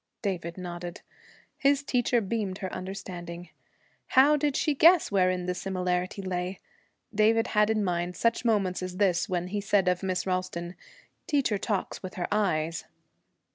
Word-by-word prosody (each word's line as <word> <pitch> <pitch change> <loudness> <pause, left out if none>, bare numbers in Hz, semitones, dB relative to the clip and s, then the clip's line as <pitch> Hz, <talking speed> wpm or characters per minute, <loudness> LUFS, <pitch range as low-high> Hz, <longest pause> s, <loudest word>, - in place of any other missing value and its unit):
David 175 -4 -3
nodded. 175 -1 -6 0.6
His 280 0 +3
teacher 245 -3 +1
beamed 200 -2 -2
her 190 -2 -5
understanding. 180 -2 -7 0.6
How 280 +3 +6
did 290 -1 0
she 300 - +1
guess 330 +2 +5
wherein 185 -2 +2
the 180 - -1
similarity 180 0 -2
lay? 180 0 -3 0.5
David 225 +2 +3
had 210 0 +3
in 215 -1 +1
mind 175 -1 -2
such 230 +1 +1
moments 200 -6 +1
as 185 0 -5
this 185 -1 +2
when 180 -1 -1
he 205 +1 -2
said 195 -1 +2
of 180 -1 +2
Miss 185 -1 -1
Ralston, 185 -2 -2 0.5
'Teacher 275 - +1
talks 205 -2 -2
with 185 +2 -7
her 180 -3 -2
eyes.' 165 -6 0
190 Hz, 150 wpm, -28 LUFS, 180-215 Hz, 0.6 s, How